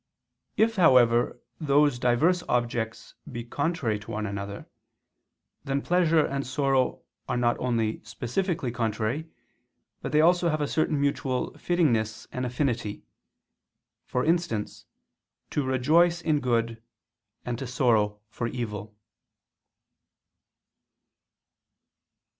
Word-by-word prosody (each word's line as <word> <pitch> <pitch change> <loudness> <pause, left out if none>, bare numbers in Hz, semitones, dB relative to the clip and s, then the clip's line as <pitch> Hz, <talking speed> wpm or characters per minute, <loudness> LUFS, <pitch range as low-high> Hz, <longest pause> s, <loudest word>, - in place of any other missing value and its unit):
If, 220 +1 +3
however, 120 -8 +4 0.2
those 145 -3 +3
diverse 150 +10 +3
objects 120 -2 -1 0.2
be 120 -2 -5
contrary 140 -3 -1
to 110 - -13
one 110 -2 -3
another, 100 0 -5 1.0
then 135 +1 -1
pleasure 165 -3 +3
and 140 0 -2
sorrow 135 -1 0 0.3
are 125 - 0
not 120 -1 +2
only 115 -3 0
specifically 125 - -2
contrary, 115 +6 -2 0.7
but - - -4
they 150 - +3
also 175 +2 +4
have 155 -1 0
a 145 - 0
certain 155 -1 0
mutual 135 -2 0
fittingness 115 -11 0
and 125 0 -2
affinity: 120 -5 -2 1.0
for 125 - -1
instance 165 -10 -1 0.7
to 145 - 0
rejoice 155 +7 +3
in 155 -3 +1
good 115 -3 0 0.6
and 120 -1 -3
to 135 - -4
sorrow 110 -5 +1
for 115 +2 -4
evil. 110 -3 -5
125 Hz, 105 wpm, -27 LUFS, 115-155 Hz, 1.0 s, however